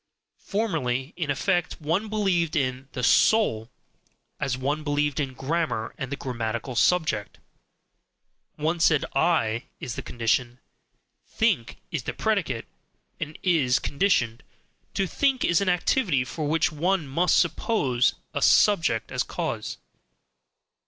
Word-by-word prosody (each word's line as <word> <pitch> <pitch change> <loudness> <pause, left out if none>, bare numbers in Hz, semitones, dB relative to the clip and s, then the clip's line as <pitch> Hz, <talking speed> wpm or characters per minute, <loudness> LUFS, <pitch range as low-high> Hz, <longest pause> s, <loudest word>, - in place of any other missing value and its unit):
Formerly, 155 - -2
in 160 -5 -3
effect, 175 +5 0
one 170 +8 -1
believed 185 -7 +1
in 130 -2 -1
"the 125 - -4
soul" 120 - +3 0.7
as 135 -2 -1
one 145 +4 -2
believed 145 -1 0
in 135 -3 -2
grammar 135 -5 -2
and 135 0 -6
the - - -1
grammatical 120 -1 -4
subject: 135 -9 +1 1.2
one 160 +3 -1
said, 160 -3 +3
"I" 135 -5 +1
is 120 - -5
the - - -5
condition, 120 +1 -1 0.7
"think" 215 - 0
is - - -2
the - - -4
predicate - - -1 0.5
and 155 0 -5
is 155 -9 +3
conditioned 135 - +1 0.5
to 195 - +1
think 265 - +1
is 170 +2 +3
an 200 - +1
activity 180 - +2
for 150 +4 -4
which 160 +1 +2
one 170 +1 0
MUST 170 +7 +2
suppose 145 - +1 0.2
a - - -2
subject 160 - +3
as - - 0
cause. - - -3
150 Hz, 125 wpm, -25 LUFS, 125-175 Hz, 1.2 s, soul